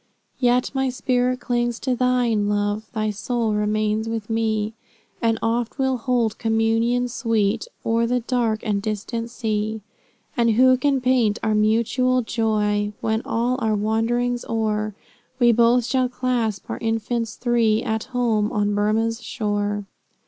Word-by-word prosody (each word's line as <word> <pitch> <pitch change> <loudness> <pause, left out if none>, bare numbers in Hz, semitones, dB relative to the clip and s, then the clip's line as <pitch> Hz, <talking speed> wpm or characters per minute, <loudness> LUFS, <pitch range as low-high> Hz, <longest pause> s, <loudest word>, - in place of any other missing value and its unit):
Yet 250 -1 +2
my 265 -1 0
spirit 250 0 0
clings 240 -1 0
to 255 -1 0
thine, 240 -4 +1
Love, 205 +1 -1
Thy 215 -2 -1
soul 225 +1 -1
remains 215 +1 0
with 225 -1 -4
me, 220 -1 0 0.5
And 225 -1 +2
oft 230 +2 -1
we'll 265 -2 +1
hold 235 -2 0
communion 225 +2 +1
sweet, 225 -3 0 0.2
O'er 230 +1 +2
the 250 +1 0
dark 230 -3 0
and 205 -3 0
distant 220 +2 -3
sea. 220 -2 -2 0.5
And 235 -2 +3
who 255 +3 +6
can 270 +1 +1
paint 245 -4 +2
our 220 -1 +1
mutual 235 +4 +2
joy, 210 -2 0
When, 220 0 0
all 240 +2 0
our 220 -3 +1
wanderings 235 +3 0
o'er, 215 -2 -1 0.4
We 240 -2 +5
both 235 +1 +4
shall 255 +1 +1
clasp 245 -5 -1
our - - -4
infants 225 0 -2
three, 230 -3 +2
At 220 -2 -2
home, 235 -4 0
on 205 -1 0
Burmah's 220 +3 0
shore. 205 -2 -2
225 Hz, 140 wpm, -22 LUFS, 215-245 Hz, 0.5 s, who